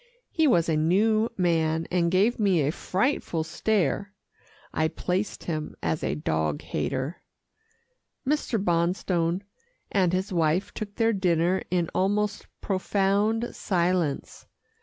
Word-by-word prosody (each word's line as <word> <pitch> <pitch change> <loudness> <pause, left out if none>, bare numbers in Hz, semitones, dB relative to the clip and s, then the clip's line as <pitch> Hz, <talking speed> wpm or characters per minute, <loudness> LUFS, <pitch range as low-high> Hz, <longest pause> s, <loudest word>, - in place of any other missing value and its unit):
He 320 -2 +3
was 175 - +3
a 160 - +2
new 215 +8 +3
man, 165 -3 +1
and 175 -2 +2
gave 200 +7 +2
me 195 -6 +3
a 145 - +1
frightful 185 - -1
stare. 200 +3 -1 0.6
I 155 - +2
placed 180 +5 -2
him 155 -3 -4
as 160 - -1
a - - 0
dog 80 - -1
hater. 130 - -3 1.1
Mr. 290 -5 +1
Bonstone 175 0 0 0.5
and 185 -4 +3
his 185 +2 -1
wife 165 +2 +1
took 205 -1 -6
their 225 0 +2
dinner 180 -1 +2
in 175 -2 0
almost 205 +2 0
profound 200 +4 0
silence. 175 -5 -1
180 Hz, 120 wpm, -26 LUFS, 165-205 Hz, 1.1 s, He